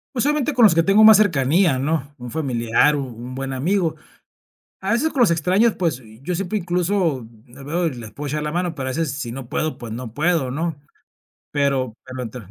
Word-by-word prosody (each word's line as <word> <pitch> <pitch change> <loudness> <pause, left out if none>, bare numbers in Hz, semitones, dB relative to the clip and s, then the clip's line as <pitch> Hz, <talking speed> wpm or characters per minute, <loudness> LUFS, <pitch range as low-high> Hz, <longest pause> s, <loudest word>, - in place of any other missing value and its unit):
Pues, 240 - +1
solamente 295 -1 +1
con 245 - +1
los 205 -7 +7
que 165 - +4
tengo 200 +4 +5
más 220 -1 +9
cercanía, 165 -5 +3
¿no?, 145 0 -2
un 125 0 -7
familiar, 125 0 +1
un 140 - -2
un 125 +2 -8
buen 135 +1 -4
amigo, 165 +5 0 0.9
a 195 +2 -1
veces 285 +8 +1
con 275 - -1
los 230 -7 +5
extraños, 185 +8 +2
pues, 160 -8 -1 0.2
yo 175 +5 -2
siempre 195 +3 -2
incluso 175 - 0 0.2
veo 140 +8 -3
y 160 - +1
les 115 -3 -9
puedo 145 0 -6
echar 150 +2 -2
la 150 0 -3
mano, 175 0 -1
pero 135 -3 -4
a - - -2
veces 160 -2 -1
si 135 -5 -5
no 125 -1 -8
puedo, 155 0 -1
pues 115 -3 -8
no 115 -1 -7
puedo, 155 -2 +1
¿no?, 155 +2 -3 0.7
pero 135 -5 0
pero 130 0 -6
entre, 125 0 -7
150 Hz, 210 wpm, -21 LUFS, 130-180 Hz, 0.9 s, más